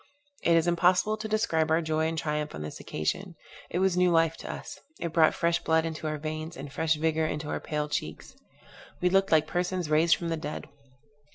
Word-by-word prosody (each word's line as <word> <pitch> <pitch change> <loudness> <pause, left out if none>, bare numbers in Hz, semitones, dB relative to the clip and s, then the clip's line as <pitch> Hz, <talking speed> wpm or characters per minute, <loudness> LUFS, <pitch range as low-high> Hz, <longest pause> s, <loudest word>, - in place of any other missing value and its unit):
It 170 - +4
is 165 0 +4
impossible 180 +4 +3
to 215 0 -5
describe 215 -8 +1
our 160 +1 +4
joy 160 0 0
and 165 0 -3
triumph 150 0 -2
on 75 - -5
this 75 - -7
occasion. 170 - -3 0.3
It - - -2
was 190 -1 +2
new 180 0 +4
life 165 -1 +3
to - - -6
us; - - -8 0.2
it 170 -2 -3
brought 160 -1 +4
fresh 170 0 +1
blood 160 0 +2
into 160 -1 -4
our 155 0 -2
veins, 155 +2 -5
and 140 +1 -8
fresh 160 +1 +1
vigor 160 0 +1
into 150 0 -4
our - - -2
pale 150 -1 -2
cheeks: 80 - -5 0.6
we 180 0 +2
looked 195 0 +3
like 155 -1 +5
persons 180 -1 -2
raised 160 +2 +5
from 170 - -4
the 165 - -1
dead. 150 -1 -6
160 Hz, 210 wpm, -28 LUFS, 155-175 Hz, 0.6 s, like